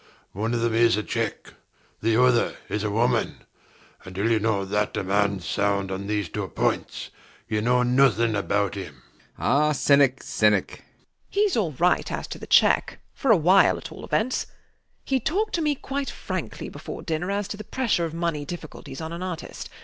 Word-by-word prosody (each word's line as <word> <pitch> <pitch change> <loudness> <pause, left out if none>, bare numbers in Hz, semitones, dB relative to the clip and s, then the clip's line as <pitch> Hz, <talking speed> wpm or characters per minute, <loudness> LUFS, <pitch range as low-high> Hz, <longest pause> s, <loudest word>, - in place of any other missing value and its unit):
One 110 +5 -2
of 115 - -1
them 115 -1 +1
is 115 -1 +4
a 105 - -1
cheque. 115 -2 -3 0.5
The 115 +1 +2
other 125 -1 +3
is 105 +1 -2
a 105 - 0
woman. 115 +3 0 0.6
Until 100 +5 -2
you 110 - +3
know 105 -2 0
that 105 +2 -1
a - - -1
man's 100 -1 0
sound 100 -1 0
on 95 +1 -4
these 105 -3 -1
two - - -4
points, - - -2 0.4
you 105 0 -1
know 125 +2 +3
nothing 120 -3 +3
about 100 0 0
him. 95 -8 -7
B. 65 - -27
B. - - -30
Ah, 150 +2 +2
cynic, 140 -2 +3
cynic! 105 -2 +2
WALPOLE. - - -14 0.4
He's 405 -1 +1
all 200 -9 +1
right 175 +7 +1
as - - -3
to - - -6
the - - -9
cheque, - - +4 0.2
for 270 - -2
a 220 - +7
while 180 +4 +5
at - - -9
all - - -10
events. 245 +4 0 0.6
He 265 -1 +1
talked 405 - -1
to 335 - 0
me 300 -2 +1
quite 275 +1 -4
frankly - - -5
before - - -8
dinner 165 +2 -2
as 200 0 -1
to 205 - -5
the 215 - -7
pressure 230 -6 0
of 165 0 -6
money 165 -3 -1
difficulties 155 -3 -8
on 160 +1 -5
an 170 - -6
artist. 180 -3 -6
125 Hz, 195 wpm, -25 LUFS, 105-175 Hz, 0.6 s, a